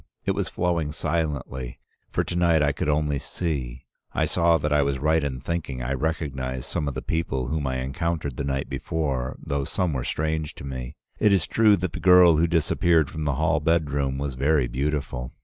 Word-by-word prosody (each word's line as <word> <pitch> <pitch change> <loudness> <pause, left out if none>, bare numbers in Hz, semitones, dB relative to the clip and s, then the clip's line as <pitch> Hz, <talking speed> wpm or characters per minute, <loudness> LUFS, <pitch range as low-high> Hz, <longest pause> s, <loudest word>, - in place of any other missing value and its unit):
It - - +2
was - - -1
flowing 85 -4 0
silently, 75 -6 -3 0.3
for - - 0
to 85 - -4
night 85 -3 +3
I 70 - +3
could 75 +1 -2
only 75 -1 +1
see. 65 -8 -4 0.3
I - - +1
saw 85 -1 +3
that 75 0 -1
I 75 - +4
was 70 -1 0
right 80 +3 +2
in 65 -3 -3
thinking 75 -6 -3
I 65 +2 -1
recognized 65 -3 -2
some 75 - -2
of 70 - -3
the 65 - -4
people 65 -6 -1
whom 75 -2 -1
I 65 0 -1
encountered 75 0 -2
the - - -3
night 70 0 -2
before, 70 -6 -2
though 70 0 -2
some 85 +3 -1
were 65 -2 -2
strange 80 +1 -2
to - - -10
me. 65 0 -6 0.2
It 105 - +4
is 95 -2 +3
true 110 -2 +4
that 90 -2 -3
the 90 - -4
girl 90 -2 +7
who 85 +2 +3
disappeared 80 -1 +2
from 80 -1 -4
the 70 -2 +1
hall 75 +1 +2
bedroom 70 -4 +1
was 70 -1 -3
very 70 +2 +2
beautiful. 65 0 -3
75 Hz, 200 wpm, -25 LUFS, 65-80 Hz, 0.3 s, girl